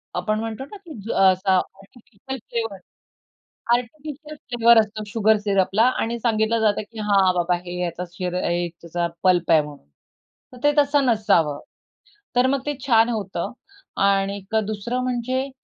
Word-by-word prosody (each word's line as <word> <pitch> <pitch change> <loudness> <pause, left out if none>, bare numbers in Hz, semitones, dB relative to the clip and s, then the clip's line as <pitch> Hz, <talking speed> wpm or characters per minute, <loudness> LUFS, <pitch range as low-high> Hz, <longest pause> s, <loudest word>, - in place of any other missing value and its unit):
आपण 215 0 -1
म्हणतो 225 +3 -4
ना, 415 - -11
की 345 -5 -12
ज - - -3
असा 190 0 +3
आर्टिफिशियल 215 +7 -7
फ्लेवर, 225 -4 -3 1.0
आर्टिफिशियल 300 +5 -6
फ्लेवर 235 -1 +6
असतो 215 0 -2
शुगर 220 0 +3
सिरपला 195 +1 +2 0.2
आणि 235 +1 -2
सांगितलं 225 0 +1
जातं, 215 -1 +2
की 225 - -9
हां 195 -2 +4
बाबा, 175 0 +1
हे 175 0 -5
याचा 175 +1 -3
शिर 180 0 -4
अ, - - 0 0.3
त्याचा 170 +1 -2 0.2
पल्प 175 -2 +3
आहे 160 - +6
म्हणून. 145 - -11 0.7
तर - - -11
ते 290 - +5
तसं 285 -1 +3
नसावं. 170 - +2 0.8
तर 250 +1 +5
मग 275 0 +1
ते 295 - -1
छान 230 -3 +5
होतं 200 -2 -3 0.5
आणि 195 0 +2
एक 200 +2 -5
दुसरं 235 +4 -3
म्हणजे 255 +2 -2
220 Hz, 155 wpm, -22 LUFS, 190-245 Hz, 1.0 s, फ्लेवर